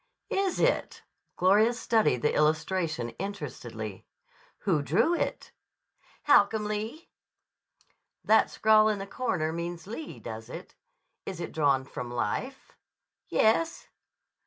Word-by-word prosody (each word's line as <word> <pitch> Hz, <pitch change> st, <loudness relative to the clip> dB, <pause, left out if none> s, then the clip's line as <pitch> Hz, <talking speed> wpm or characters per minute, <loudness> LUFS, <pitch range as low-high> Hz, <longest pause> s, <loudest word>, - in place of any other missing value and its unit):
"Is 390 Hz, -2 st, 0 dB
it?" -, -, 0 dB, 0.3 s
Gloria 210 Hz, +6 st, +4 dB
studied 225 Hz, -, +1 dB
the 150 Hz, -, +2 dB
illustration 155 Hz, -4 st, 0 dB
interestedly. 125 Hz, -, -6 dB, 0.5 s
"Who 165 Hz, -7 st, +1 dB
drew 220 Hz, -, +2 dB
it?" -, -, -2 dB, 0.7 s
"Holcomb 215 Hz, -5 st, +4 dB
Lee." 215 Hz, +9 st, -4 dB, 1.1 s
"That 220 Hz, +1 st, +4 dB
scrawl 215 Hz, 0 st, +4 dB
in 210 Hz, -, 0 dB
the 195 Hz, -, -5 dB
corner 195 Hz, -8 st, -2 dB
means 170 Hz, 0 st, -5 dB
Lee, 235 Hz, +10 st, -7 dB
does 110 Hz, -1 st, -8 dB
it? -, -, -9 dB, 0.5 s
Is 185 Hz, -3 st, -5 dB
it 170 Hz, -, -5 dB
drawn 140 Hz, -4 st, +2 dB
from 125 Hz, -1 st, -6 dB
life?" 120 Hz, -, -3 dB, 0.5 s
"Yes." 275 Hz, +10 st, +1 dB
195 Hz, 110 wpm, -28 LUFS, 150-220 Hz, 1.1 s, Gloria